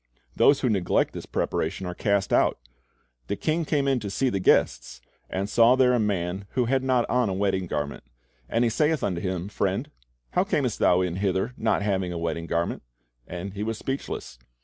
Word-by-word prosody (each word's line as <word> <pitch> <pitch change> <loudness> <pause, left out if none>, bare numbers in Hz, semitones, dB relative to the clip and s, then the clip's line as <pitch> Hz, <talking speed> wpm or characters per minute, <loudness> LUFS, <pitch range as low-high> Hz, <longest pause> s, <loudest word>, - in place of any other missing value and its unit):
Those 140 0 +4
who 125 - +2
neglect 95 -4 +1
this - - -7
preparation 95 - -2
are 90 - -4
cast 100 +1 0
out. - - +3 0.7
"The - - -1
king 160 +7 -1
came 145 -2 0
in 135 -2 +2
to 105 - -5
see 130 +7 0
the 100 - -1
guests," - - +2 0.3
and 95 +1 -2
"saw 115 +3 +5
there 130 -1 +4
a 120 - +2
man 95 -2 -1
which 125 -2 +1
had 135 0 +2
not 130 -2 +1
on 125 -2 +1
a 95 - -2
wedding 95 -2 0
garment; 75 -2 -3 0.5
and 115 - +2
he 120 - +3
saith 150 +4 +1
unto 90 -4 -1
him, 95 -1 -3
Friend, 105 - -2 0.4
how - - +2
camest - - -1
thou 90 +1 +4
in 90 -1 -1
hither 95 +4 0
not 110 -2 0
having 95 -3 0
a 85 - -4
wedding 85 0 -3
garment? 85 0 -1 0.5
And 90 +2 -6
he 100 - -6
was 110 +1 -2
speechless. 120 - -5
100 Hz, 195 wpm, -26 LUFS, 90-125 Hz, 0.7 s, saw